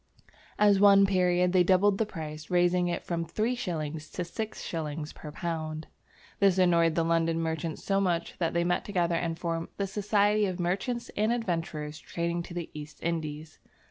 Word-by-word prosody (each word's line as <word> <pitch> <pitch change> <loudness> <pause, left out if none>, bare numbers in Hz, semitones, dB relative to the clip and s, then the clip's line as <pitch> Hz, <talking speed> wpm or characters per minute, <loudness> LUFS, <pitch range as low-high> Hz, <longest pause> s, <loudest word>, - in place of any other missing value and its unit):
At 205 -1 +5
one 200 -1 +7
period 180 -2 +2
they 185 -1 +5
doubled 195 +2 +3
the 220 - +1
price, 155 -4 -7
raising 175 0 +3
it 175 - -2
from 170 -1 -2
three 215 +9 -1
shillings 160 -9 -4
to 180 - -3
six 220 +5 -5
shillings 155 -2 -4
per 150 - -9
pound. 155 -1 -4 0.5
This 195 -2 +4
annoyed 170 -3 +4
the 165 - +2
London 165 0 +1
merchants 160 -1 -3
so 195 0 +1
much 175 -3 -1
that 170 -1 0
they 170 - +3
met 175 0 0
together 175 -4 0
and 165 -1 -1
formed 165 -1 -2
the 200 - 0
"Society 205 +1 +2
of 185 -1 -4
Merchants 195 +8 -2
and 215 +2 +2
Adventurers 165 -9 -3
trading 170 0 -2
to 170 - -9
the 170 -2 -5
East 150 0 -9
Indies." 155 -2 -4
175 Hz, 175 wpm, -29 LUFS, 165-195 Hz, 0.5 s, one